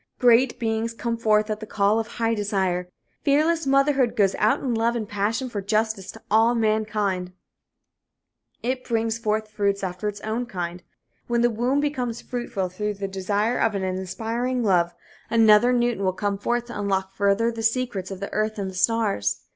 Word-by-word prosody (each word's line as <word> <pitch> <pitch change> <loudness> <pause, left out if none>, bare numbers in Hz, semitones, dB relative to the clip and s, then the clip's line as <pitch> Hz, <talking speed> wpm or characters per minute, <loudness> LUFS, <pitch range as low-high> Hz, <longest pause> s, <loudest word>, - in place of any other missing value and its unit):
Great 245 0 +4
beings 225 0 -1
come 235 0 -2
forth 215 -2 +2
at 215 - -2
the 215 - -7
call 205 +2 +2
of 225 - -3
high 230 -1 -1
desire. 190 -4 -1 0.3
Fearless 310 +2 +2
motherhood 275 -2 +3
goes 195 -2 +3
out 215 - +3
in 255 -3 -2
love 230 +1 +1
and 220 -3 -3
passion 210 +5 -1
for 210 -5 -4
justice 215 -1 -1
to - - -13
all 225 +3 +4
mankind. 210 -4 0 1.3
It 255 +1 -1
brings 225 -1 -1
forth 215 -1 -1
fruits 200 -2 0
after 185 +2 -3
its 205 0 -4
own 230 +3 -2
kind. 175 -4 -5 0.5
When 235 0 +1
the 240 0 +3
womb 245 +6 +1
becomes 250 -6 -2
fruitful 240 -7 -3
through 210 +3 -3
the 195 0 -4
desire 200 +5 -1
of 225 -2 +2
an 195 - -2
aspiring 225 +7 -2
love, 175 -4 +2 0.3
another 225 +1 +5
Newton 240 -4 +1
will 185 -1 +1
come 200 0 -2
forth 240 +3 -1
to 240 -3 -7
unlock 195 -1 -1
further 200 +4 +2
the 230 -1 -6
secrets 230 -5 -1
of 195 -2 -6
the 200 - -6
earth 215 +1 -1
and 195 -2 -3
the - - -13
stars. 195 - +1
220 Hz, 180 wpm, -24 LUFS, 200-235 Hz, 1.3 s, another